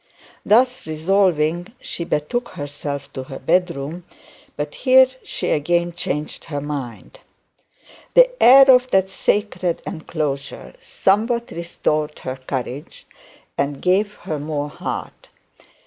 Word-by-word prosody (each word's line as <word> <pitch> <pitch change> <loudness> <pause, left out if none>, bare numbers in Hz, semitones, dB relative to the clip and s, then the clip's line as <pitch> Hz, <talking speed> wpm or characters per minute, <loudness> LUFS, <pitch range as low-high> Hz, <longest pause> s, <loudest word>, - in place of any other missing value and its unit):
Thus 250 0 +3
resolving, 175 +2 +1
she 170 - -5
betook 205 +12 -2
herself 145 -1 -6
to 130 - -5
her 135 - -8
bed 180 0 +2
room; 150 +6 -6 0.5
but 145 0 -4
here 260 0 +6 0.2
she - - -3
again 175 +3 +1
changed 150 -2 -4
her 145 -3 -4
mind. 145 - -6 1.0
The - - +8
air 270 +2 +9
of 250 0 +4
that 190 -3 +2
sacred 185 -5 0
enclosure 150 -5 -4 0.8
restored 155 -3 -2
her 130 - -5
courage, 130 +2 -6 0.5
and 140 0 -1
gave 200 +3 +1
her 155 -2 -5
some 145 0 -3
heart. - - -6
160 Hz, 115 wpm, -21 LUFS, 145-195 Hz, 1.0 s, air